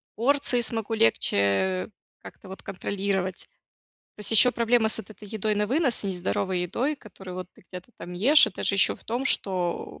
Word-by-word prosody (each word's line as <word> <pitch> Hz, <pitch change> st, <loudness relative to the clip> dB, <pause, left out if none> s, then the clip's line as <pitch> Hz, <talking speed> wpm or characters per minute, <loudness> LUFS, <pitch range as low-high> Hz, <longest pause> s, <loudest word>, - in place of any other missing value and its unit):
порции 255 Hz, 0 st, +2 dB
смогу 225 Hz, -1 st, -2 dB
легче, 115 Hz, -2 st, +2 dB
э, 100 Hz, -, +1 dB, 0.3 s
как-то, 190 Hz, -, -13 dB
вот, 190 Hz, -, -9 dB
контролировать. 195 Hz, -1 st, -3 dB, 0.7 s
То -, -, -13 dB
есть, 205 Hz, -, -5 dB
еще 245 Hz, +3 st, +6 dB
проблема 235 Hz, -1 st, +2 dB
с 220 Hz, -, +5 dB
вот 215 Hz, 0 st, -9 dB
этой 210 Hz, 0 st, -11 dB
едой 215 Hz, 0 st, 0 dB
на 210 Hz, 0 st, 0 dB
вынос, 265 Hz, -2 st, +1 dB
нездоровой 185 Hz, -1 st, -2 dB
едой, 255 Hz, -, -1 dB
которую, 190 Hz, -5 st, -11 dB
вот, 185 Hz, -1 st, -7 dB
ты -, -, -21 dB
где-то 185 Hz, +6 st, -10 dB
там 180 Hz, -, -8 dB
ешь, 260 Hz, -, +6 dB
это 195 Hz, -, -6 dB
же, 200 Hz, -, +2 dB
еще, 190 Hz, -, +3 dB
в -, -, -16 dB
том, 240 Hz, +4 st, -3 dB
что, 175 Hz, -, -2 dB
200 Hz, 185 wpm, -25 LUFS, 185-230 Hz, 0.7 s, еще